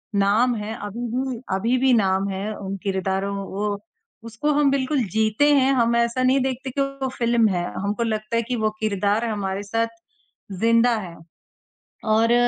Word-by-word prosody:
नाम 215 Hz, +5 st, +3 dB
है, 215 Hz, +1 st, -4 dB
अभी 235 Hz, +4 st, -4 dB
भी, 255 Hz, -2 st, -2 dB
अभी 230 Hz, +6 st, +1 dB
भी 260 Hz, 0 st, +3 dB
नाम 195 Hz, -3 st, +2 dB
है 195 Hz, +3 st, -3 dB
उन 195 Hz, 0 st, -5 dB
किरदारों 195 Hz, 0 st, -1 dB
वो 200 Hz, +1 st, -3 dB, 0.5 s
उसको 230 Hz, +7 st, -1 dB
हम 290 Hz, -1 st, +3 dB
बिल्कुल 275 Hz, -1 st, +1 dB
जीते 220 Hz, +5 st, +2 dB
हैं, 270 Hz, 0 st, +4 dB
हम 235 Hz, -2 st, +2 dB
ऐसा 235 Hz, +2 st, +1 dB
नहीं 260 Hz, +2 st, +4 dB
देखते 260 Hz, 0 st, -2 dB
कि 275 Hz, -, -1 dB
वो 275 Hz, -1 st, -2 dB
फ़िल्म 235 Hz, -1 st, +3 dB
है, 175 Hz, -2 st, -1 dB, 0.2 s
हमको 205 Hz, +4 st, -1 dB
लगता 215 Hz, 0 st, -2 dB
है 230 Hz, -, +3 dB
कि 245 Hz, +2 st, -3 dB
वो 215 Hz, -1 st, +1 dB
किरदार 210 Hz, +1 st, 0 dB
हमारे 200 Hz, -3 st, -2 dB
साथ 225 Hz, +3 st, 0 dB, 0.7 s
ज़िंदा 230 Hz, +1 st, +4 dB
है। 175 Hz, -4 st, -8 dB, 1.0 s
और 230 Hz, +2 st, +4 dB
225 Hz, 170 wpm, -23 LUFS, 200-250 Hz, 1.0 s, हैं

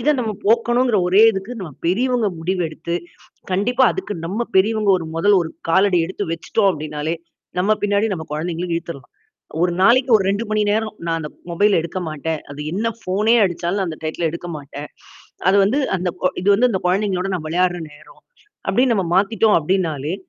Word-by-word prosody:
இத 295 Hz, +6 st, +2 dB
நம்ம 225 Hz, -3 st, -1 dB
போக்கணுங்கிற 240 Hz, +2 st, +3 dB
ஒரே 190 Hz, +4 st, +5 dB
இதுக்கு, 195 Hz, +5 st, -5 dB
நம்ம 175 Hz, -, -6 dB, 0.2 s
பெரியவங்க 235 Hz, +4 st, +1 dB
முடிவு 180 Hz, +3 st, -1 dB
எடுத்து, 165 Hz, +2 st, -5 dB, 0.6 s
கண்டிப்பா 230 Hz, +8 st, +2 dB
அதுக்கு 380 Hz, -, -5 dB
நம்ம 195 Hz, +7 st, -3 dB, 0.2 s
பெரியவங்க 200 Hz, -4 st, +2 dB
மொதல் 200 Hz, +5 st, +4 dB
ஒரு 165 Hz, -, -4 dB, 0.2 s
காலடி 190 Hz, +1 st, +4 dB
எடுத்து 190 Hz, -, -4 dB
வச்சிட்டோம் 195 Hz, +5 st, +1 dB
அப்டின்னாலே, 155 Hz, 0 st, -4 dB, 0.4 s
நம்ம 195 Hz, +4 st, +2 dB
பின்னாடி 205 Hz, +1 st, +2 dB
நம்ப 160 Hz, -3 st, -6 dB
குழந்தைகளும் 170 Hz, +2 st, -3 dB
இழுத்துறலாம். 165 Hz, -6 st, -7 dB, 0.5 s
ஒரு 175 Hz, 0 st, +2 dB
நாளைக்கு 250 Hz, +5 st, +4 dB
ஒரு 195 Hz, -, -2 dB
2 205 Hz, +3 st, -1 dB
மணி 215 Hz, -, +2 dB
நேரம் 215 Hz, 0 st, -1 dB
நான் 165 Hz, -1 st, 0 dB
அந்த 150 Hz, -, -5 dB, 0.2 s
மொபைல்ல 200 Hz, +4 st, +3 dB
எடுக்க 170 Hz, +3 st, -5 dB
மாட்டேன். 155 Hz, +1 st, -3 dB
அது 145 Hz, -, -9 dB
என்னா 220 Hz, +5 st, 0 dB
ஃபோனே 210 Hz, +5 st, +2 dB
அடிச்சாலும் 175 Hz, +1 st, -1 dB
நான் 185 Hz, -, -1 dB
அந்த 155 Hz, -, -8 dB
டையித்துல 160 Hz, +1 st, -1 dB
எடுக்க 170 Hz, +1 st, -6 dB
மாட்டேன். 145 Hz, 0 st, -8 dB, 0.6 s
அது 195 Hz, -, +5 dB
வந்து 225 Hz, +9 st, +1 dB, 0.2 s
அந்த 180 Hz, 0 st, -2 dB
கொ -, -, +3 dB
இது 185 Hz, -, -1 dB
வந்து 245 Hz, +5 st, +3 dB
அந்த 190 Hz, -4 st, -1 dB
கொழந்தைகளோட 190 Hz, 0 st, 0 dB
நான் 160 Hz, -4 st, -4 dB
விளையாடுற 180 Hz, +1 st, +1 dB
நேரம். 145 Hz, +1 st, -18 dB, 0.5 s
அப்டின் 245 Hz, +6 st, +3 dB
நம்ம 190 Hz, -4 st, 0 dB
மாத்திட்டோம், 210 Hz, +3 st, +3 dB
அப்டின்னாலே! 160 Hz, -3 st, -1 dB
185 Hz, 175 wpm, -20 LUFS, 165-210 Hz, 0.6 s, ஒரே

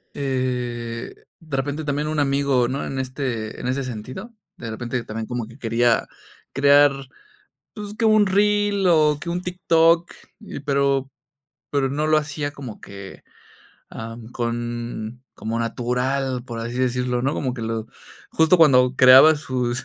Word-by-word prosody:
eh, 125 Hz, -3 st, -3 dB, 0.3 s
de 155 Hz, -5 st, -5 dB
repente 145 Hz, +3 st, -2 dB
también 150 Hz, 0 st, -2 dB
un 155 Hz, 0 st, -1 dB
amigo, 140 Hz, -3 st, +2 dB
¿no?, 135 Hz, +3 st, -3 dB
en 135 Hz, -, -5 dB
este 130 Hz, -4 st, -4 dB
en 125 Hz, -, -4 dB
ese 135 Hz, +2 st, -1 dB
sentido, 130 Hz, -, -7 dB, 0.2 s
de 115 Hz, -1 st, -6 dB
repente 120 Hz, +2 st, -4 dB
también 110 Hz, 0 st, -6 dB
como 120 Hz, -2 st, -3 dB
que 115 Hz, +4 st, -15 dB
quería 115 Hz, 0 st, +1 dB, 0.4 s
crear, 145 Hz, +1 st, +5 dB, 0.8 s
pues, 210 Hz, -1 st, -7 dB
que 225 Hz, -, +2 dB
un 215 Hz, -1 st, +5 dB
reel 205 Hz, 0 st, +2 dB
o 155 Hz, -3 st, +4 dB
que 170 Hz, -, -7 dB
un 175 Hz, +1 st, -2 dB
TikTok, 170 Hz, -1 st, +2 dB, 0.3 s
y 205 Hz, -9 st, -8 dB
pero 140 Hz, -1 st, 0 dB, 0.6 s
pero 140 Hz, -2 st, +1 dB
no 150 Hz, +3 st, -1 dB
lo 155 Hz, 0 st, +4 dB
hacía 145 Hz, -1 st, -2 dB
como 130 Hz, -7 st, -9 dB
que, 100 Hz, -1 st, -10 dB, 0.7 s
ah, 115 Hz, 0 st, -8 dB, 0.2 s
con 120 Hz, 0 st, -4 dB
como 115 Hz, +1 st, -3 dB
natural, 125 Hz, +2 st, -1 dB
por 120 Hz, -2 st, -7 dB
así 115 Hz, +2 st, -5 dB
decirlo, 125 Hz, -1 st, 0 dB
¿no?, 135 Hz, +3 st, 0 dB
como 130 Hz, -3 st, -2 dB
que 115 Hz, -, -6 dB
lo 110 Hz, -1 st, -3 dB, 0.5 s
justo 160 Hz, +3 st, +4 dB
cuando 130 Hz, -5 st, +5 dB
creaba 130 Hz, +5 st, +8 dB
sus 130 Hz, -3 st, -2 dB
130 Hz, 150 wpm, -22 LUFS, 120-150 Hz, 0.8 s, creaba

